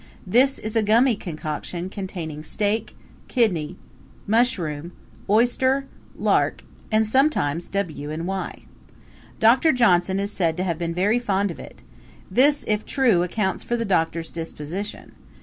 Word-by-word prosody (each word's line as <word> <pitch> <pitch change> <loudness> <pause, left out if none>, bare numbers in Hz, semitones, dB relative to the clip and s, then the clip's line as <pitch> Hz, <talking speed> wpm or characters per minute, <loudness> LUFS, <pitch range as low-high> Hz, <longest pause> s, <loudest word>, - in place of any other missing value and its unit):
This 255 +8 +4
is 215 +1 -5
a 225 - +4
gummy 230 +4 +4
concoction 170 0 -5
containing 180 -6 -6
steak, 210 +5 -1 0.3
kidney, 185 - 0 0.5
mushroom, 180 - 0 0.4
oyster, 260 +5 +3 0.3
lark - - +1 0.3
and 220 0 +3
sometimes 215 - +1
W 170 -7 -3
and 160 +2 -4
Y. 190 +1 -4 0.8
Doctor 255 +8 +5
Johnson 190 - +3
is 200 +1 -2
said 165 -5 0
to 185 - -1
have 170 -3 -2
been 170 -1 -3
very 205 +6 +2
fond 200 -4 0
of - - -10
it; - - -12 0.5
this, 285 +3 +4
if 210 0 +1
true, 240 -10 +2
accounts 190 +2 -1
for 240 - -1
the 230 - -2
doctor's 165 -4 0
disposition. 165 +4 -6
200 Hz, 135 wpm, -23 LUFS, 170-230 Hz, 0.8 s, Doctor